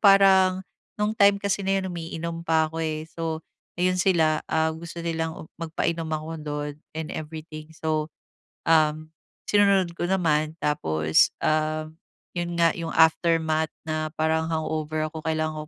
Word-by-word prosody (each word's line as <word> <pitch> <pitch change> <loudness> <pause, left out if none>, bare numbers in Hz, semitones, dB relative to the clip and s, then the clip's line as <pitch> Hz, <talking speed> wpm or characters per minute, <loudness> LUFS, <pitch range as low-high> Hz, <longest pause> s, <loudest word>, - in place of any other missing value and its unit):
parang 190 -2 +6 0.4
nung 210 +1 +2
time 200 0 +6
kasi 200 -1 0
na 195 0 +2
yun, 190 -1 -4
umiinom 165 0 -5
pa 160 -1 +3
ako, 165 - -5
eh, 155 -1 -2
so 160 -1 -3 0.4
ayun 185 0 +2
sila, 160 -4 +3
ah, 160 0 +2
gusto 170 +1 -8
nilang 160 -1 -3
magpainom 165 0 -2
ako 155 0 -3
'don 145 -1 -4 0.2
and 160 -1 -3
everything. 155 0 -7
So, 155 -1 -1 0.6
um, 155 -1 +3 0.4
sinunod 200 -4 +4
ko 175 - -1
naman, 155 -4 +1
tapos, 80 - +3 0.2
ah, 155 0 +1 0.5
yun 175 0 -2
nga 165 -1 +5
yung 165 -1 -4
aftermath 160 -1 +3 0.2
na 155 0 -2
parang 160 0 +1
hangover 155 -1 -1
ako 160 - -6
kailangan 155 -1 -1
160 Hz, 140 wpm, -25 LUFS, 155-170 Hz, 0.6 s, parang